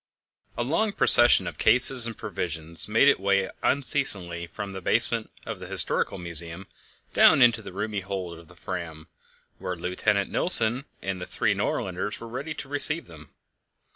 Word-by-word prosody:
A 120 Hz, -, -2 dB
long 185 Hz, -, -2 dB
procession 120 Hz, -9 st, +4 dB
of -, -, -8 dB
cases 125 Hz, -1 st, +5 dB
of 115 Hz, -, -8 dB
provisions 80 Hz, -1 st, -2 dB
made 115 Hz, +6 st, +2 dB
its 140 Hz, -, +3 dB
way 100 Hz, 0 st, -1 dB
unceasingly 100 Hz, -, -1 dB
from 100 Hz, +3 st, -8 dB
the 95 Hz, -, -8 dB
basement -, -, +1 dB, 0.2 s
of -, -, -7 dB
the -, -, -10 dB
Historical -, -, +2 dB
Museum 85 Hz, +1 st, -6 dB, 0.5 s
down -, -, +5 dB
into 120 Hz, -2 st, +3 dB
the -, -, -11 dB
roomy 105 Hz, +2 st, -5 dB
hold 95 Hz, -3 st, -7 dB
of 85 Hz, -, -18 dB
the 90 Hz, -, -19 dB
Fram, 85 Hz, -3 st, -8 dB, 0.5 s
where 90 Hz, -, -5 dB
Lieutenant 95 Hz, +3 st, -2 dB
Nilsen 125 Hz, -6 st, +4 dB, 0.2 s
and 95 Hz, -1 st, -5 dB
the 90 Hz, -, -7 dB
three -, -, -1 dB
Nordlanders 95 Hz, +3 st, -4 dB
were 115 Hz, -, -10 dB
ready 135 Hz, +7 st, -7 dB
to -, -, -9 dB
receive 150 Hz, +4 st, +1 dB
them. 80 Hz, -3 st, -15 dB
100 Hz, 165 wpm, -24 LUFS, 85-120 Hz, 0.5 s, cases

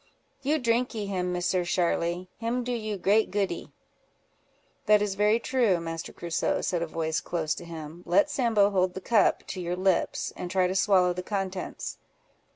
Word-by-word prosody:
"You 290 Hz, +3 st, +1 dB
drinkee 235 Hz, -4 st, 0 dB
him, 180 Hz, -2 st, -2 dB
Misser 180 Hz, 0 st, 0 dB
Sharly; 175 Hz, 0 st, 0 dB
him 235 Hz, +2 st, -1 dB
do 245 Hz, -, -3 dB
you 215 Hz, -3 st, -2 dB
great 205 Hz, +4 st, +3 dB
goodee." 195 Hz, -4 st, -2 dB, 1.2 s
"That 210 Hz, 0 st, +6 dB
is 205 Hz, -1 st, -1 dB
very 210 Hz, +3 st, +3 dB
true, 235 Hz, -8 st, +2 dB
Master 165 Hz, 0 st, -5 dB
Crusoe," 170 Hz, -2 st, -1 dB
said 175 Hz, -2 st, -1 dB
a 170 Hz, -, -1 dB
voice 160 Hz, 0 st, -2 dB
close 160 Hz, -3 st, -1 dB
to 175 Hz, -, -8 dB
him. 165 Hz, 0 st, -8 dB
"Let 190 Hz, +4 st, +4 dB
Sambo 220 Hz, -6 st, +2 dB
hold 185 Hz, -2 st, +1 dB
the -, -, -3 dB
cup 215 Hz, +2 st, +2 dB
to 185 Hz, -, -5 dB
your 175 Hz, 0 st, -2 dB
lips, 185 Hz, 0 st, 0 dB
and 175 Hz, -, -5 dB
try 185 Hz, 0 st, +2 dB
to 180 Hz, -, 0 dB
swallow 190 Hz, -2 st, +3 dB
the 180 Hz, -, -4 dB
contents." 190 Hz, -1 st, -4 dB
185 Hz, 170 wpm, -27 LUFS, 175-210 Hz, 1.2 s, That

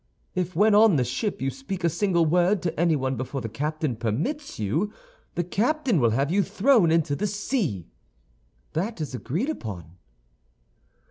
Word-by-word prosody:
If 180 Hz, 0 st, -2 dB
when 210 Hz, +4 st, +4 dB
on 210 Hz, -3 st, +6 dB
the 130 Hz, -, +3 dB
ship 130 Hz, -, -3 dB
you 135 Hz, -, 0 dB
speak 195 Hz, -9 st, -6 dB
a -, -, +4 dB
single 170 Hz, 0 st, +2 dB
word 180 Hz, +4 st, +2 dB
to 165 Hz, -3 st, -2 dB
anyone 145 Hz, -6 st, +1 dB
before 130 Hz, +3 st, -4 dB
the 115 Hz, -, -4 dB
captain 150 Hz, +2 st, -2 dB
permits 150 Hz, -, -3 dB
you, 155 Hz, -, -1 dB, 0.4 s
the 175 Hz, -, 0 dB
captain 240 Hz, -, +1 dB
will 120 Hz, -3 st, +4 dB
have 135 Hz, +7 st, 0 dB
you 200 Hz, +3 st, +3 dB
thrown 205 Hz, 0 st, +3 dB
into 160 Hz, -3 st, +2 dB
the 210 Hz, +7 st, -1 dB
sea. 200 Hz, -, -2 dB, 0.9 s
That 195 Hz, +5 st, -2 dB
is 150 Hz, -4 st, -4 dB
agreed 165 Hz, -, -2 dB
upon. 90 Hz, -, -8 dB
170 Hz, 160 wpm, -25 LUFS, 135-205 Hz, 0.9 s, on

